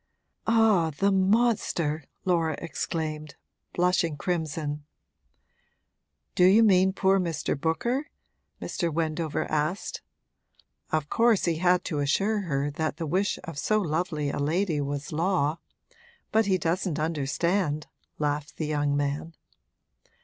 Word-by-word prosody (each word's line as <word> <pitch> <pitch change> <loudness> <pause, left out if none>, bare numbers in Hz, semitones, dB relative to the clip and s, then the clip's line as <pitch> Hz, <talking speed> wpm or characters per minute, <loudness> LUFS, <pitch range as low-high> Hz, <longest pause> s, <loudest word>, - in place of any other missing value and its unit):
'Ah, 220 -7 +4
the 200 +1 +3
monster!' 190 - +1 0.2
Laura 165 -4 +1
exclaimed, 155 -2 -4 0.4
blushing 175 -3 +1
crimson. 155 -2 -2 1.5
'Do 180 - +3
you 200 +5 +7
mean 190 -3 +5
poor 190 0 +2
Mr. 165 -5 -1
Booker?' 235 - -1 0.5
Mr. 170 -2 -2
Wendover 160 0 -1
asked. 155 +5 -1 0.9
'Of 155 -2 0
course 230 -3 +3
he 170 -2 +1
had 180 +1 +3
to 150 - -3
assure 200 +10 +1
her 145 -5 -1
that 155 +2 -2
the 165 - -3
wish 190 +6 0
of 160 -4 -6
so 215 +7 +2
lovely 155 -4 -1
a - - -4
lady 160 +2 0
was 145 0 -4
law. 165 -1 +1 0.7
But 220 -1 +3
he 190 -2 +3
doesn't 170 -1 -1
understand!' 155 +1 0 0.3
laughed 145 -1 -2
the 160 - -2
young 145 -1 0
man. 145 +3 -2
165 Hz, 120 wpm, -27 LUFS, 150-190 Hz, 1.5 s, you